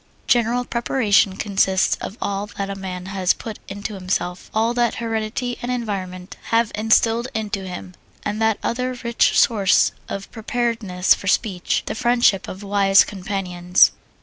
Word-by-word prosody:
General 240 +1 +2
preparation 215 -6 +2
consists 195 -2 +2
of 205 - -7
all 200 +1 -2
that 200 0 -3
a - - -4
man 185 -2 -6
has 190 -1 +1
put 220 -2 -8
into 205 +2 -6
himself, 185 -2 -3
all 225 +2 +1
that 240 -1 +1
heredity 230 +2 -3
and 245 - -3
environment 190 -6 -4
have 230 -1 +1
instilled 225 +2 +2
into 205 -3 -3
him, 180 0 -7 0.3
and 210 +1 -3
that 220 -1 +2
other 250 +1 -2
rich 235 -1 +2
source 200 -5 +4 0.2
of 195 0 -6
preparedness 225 -5 0
for 195 - -7
speech 190 -3 0
the - - -3
friendship 240 -4 +2
of 190 +2 -8
wise 195 -1 +5
companions. 185 -2 +2
205 Hz, 150 wpm, -21 LUFS, 190-230 Hz, 0.3 s, wise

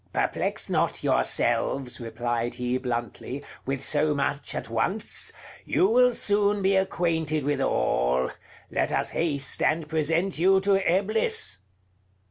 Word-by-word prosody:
"Perplex - - 0
not - - 0
yourselves," 130 -3 0
replied 120 +1 -3
he 125 +1 -1
bluntly, 125 +2 -4 0.2
"with 135 -1 -2
so 150 +1 +2
much 140 -1 -2
at - - -4
once; 175 - 0 0.3
you - - +2
will 250 +3 +4
soon 205 -2 +1
be 195 +1 +3
acquainted 160 -5 0
with 145 +1 0
all: 65 +1 +1 0.4
let - - 0
us - - 0
haste 140 -5 0
and 155 0 +1
present 165 +4 0
you 190 +2 +5
to 195 0 +3
Eblis." 195 - +1
155 Hz, 125 wpm, -26 LUFS, 125-190 Hz, 0.4 s, you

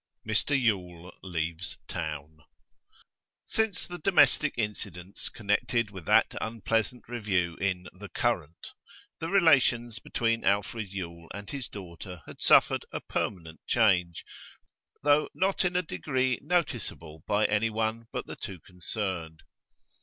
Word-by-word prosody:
MR 130 +6 +2
YULE 90 -7 -1
LEAVES 85 -1 -3
TOWN 80 -2 -5 1.1
Since 220 -4 0
the 175 0 -7
domestic 180 -5 +4
incidents 100 -4 -4
connected 110 +2 0
with 95 -5 -9
that - - +4
unpleasant 115 +2 -1
review 95 -8 0
in 90 -2 -1
The 100 +3 -10
Current, 80 +4 -1 0.5
the 165 - -3
relations 130 - +4
between 115 -1 0
Alfred 100 +2 +1
Yule 85 -3 -6
and 100 0 -7
his 135 -5 -5
daughter 90 -2 -9
had - - -12
suffered - - +5
a - - -3
permanent 80 -5 -3
change, 90 -7 +3 0.8
though 145 +1 +4
not 190 +1 +2
in 180 -1 0
a 180 - +3
degree 130 - 0
noticeable 115 - -2
by 105 +1 +3
any 110 +1 +2
one 110 +1 -1
but - - -3
the - - -7
two 95 -2 -7
concerned. 90 -3 -4
105 Hz, 125 wpm, -29 LUFS, 90-120 Hz, 1.1 s, suffered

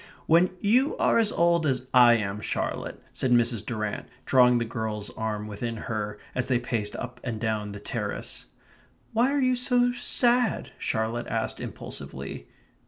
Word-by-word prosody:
"When 170 +3 +5
you 250 +8 +3
are - - +3
as 220 -1 +2
old 170 -1 +3
as 130 -2 0
I 120 -2 +8
am, 105 -2 -2
Charlotte," - - -3
said 130 - 0
Mrs. 120 -3 +3
Durrant, 110 -2 -3 0.2
drawing 125 -1 +5
the 115 - 0
girl's 110 -2 -4
arm 110 -1 -3
within 110 +2 -4
hers 105 -2 -4
as 125 - -1
they 130 - +3
paced 115 -4 -3
up 125 +1 -6
and 115 -3 -3
down 110 -2 -1
the 100 0 -7
terrace. - - -5 0.7
"Why 240 +4 +3
are 285 - +1
you 255 -1 +3
so 245 0 +2
sad?" 245 0 +2
Charlotte 115 +2 -1
asked 115 -1 -2
impulsively. - - -7
120 Hz, 160 wpm, -27 LUFS, 110-170 Hz, 0.7 s, I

